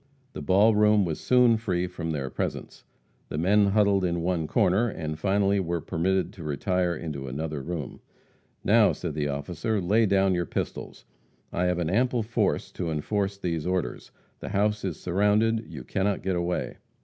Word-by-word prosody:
The - - -6
ball 100 +9 +4
room 105 -1 +4
was 80 -3 -3
soon 125 -2 +4
free 90 -5 -1
from 85 -2 -5
their 70 -4 -3
presence. - - -5 0.4
The - - -4
men 100 +5 +4
huddled 100 -1 +3
in 85 -2 -1
one 85 -3 0
corner, 100 +10 +2
and 75 -4 -5
finally 100 +2 +2
were 85 -2 -1
permitted 90 +3 -1
to 85 - -10
retire 90 +4 0
into 75 -4 -5
another 75 +2 -4
room. 80 -2 -5 0.6
"Now," 110 0 +5
said 85 -4 -5
the 75 -1 -1
officer, 80 +9 -2
"lay 105 +5 +2
down 95 -1 +3
your 85 -2 -1
pistols. - - -5 0.5
I 90 - 0
have 90 -1 +1
an 85 -1 -1
ample 120 +2 +1
force 110 -2 -1
to 85 -3 -4
enforce 100 +6 -1
these 85 -4 -3
orders. 90 -1 -2 0.3
The - - -6
house 105 +1 0
is 90 -5 -3
surrounded; 105 +5 +1
you 75 -6 -8
cannot 100 +8 -1
get 95 -1 0
away." 85 0 -2
90 Hz, 175 wpm, -26 LUFS, 80-105 Hz, 0.6 s, Now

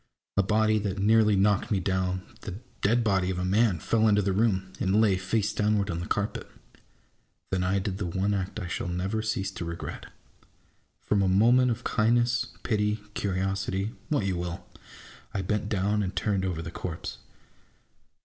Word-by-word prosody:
A 100 - +5
body 110 +2 +2
that 100 -2 -3
nearly 105 +1 +4
knocked 100 +1 +2
me 100 - +1
down, 95 0 -1 0.2
the 95 - -6 0.3
dead 115 +4 +3
body 95 -4 +2
of 95 - -2
a 90 - -1
man, 100 0 +3
fell 110 +7 +2
into 105 -1 +4
the 95 0 +1
room, 95 -3 +1
and 95 +3 +2
lay, 105 -4 +4
face 100 +3 0
downward, 105 -2 +1
on 85 - -3
the 85 - -5
carpet. 100 +1 -2 1.0
Then 95 -1 +1
I 95 +2 +1
did 95 0 -2
the 100 - -2
one 95 +4 0
act 95 +1 -3
I 100 - -4
shall 90 0 -3
never 95 +5 -1
cease 100 -3 -2
to 95 - -6
regret: 85 0 -6 0.9
From 105 -1 +1
a 95 - +2
movement 120 +6 +5
of 120 0 -2
kindness, 120 +2 +2 0.2
pity, 105 -2 +1 0.2
curiosity, 95 +1 -1 0.2
what 145 -10 +1
you 95 -2 0
will! 90 0 -4 0.7
I 95 - -1
bent 105 +2 -1
down 105 0 +1
and 95 -1 -3
turned 100 -3 0
over 85 -3 -2
the 80 - -6
corpse. 85 -1 -6
100 Hz, 180 wpm, -27 LUFS, 95-105 Hz, 1.0 s, A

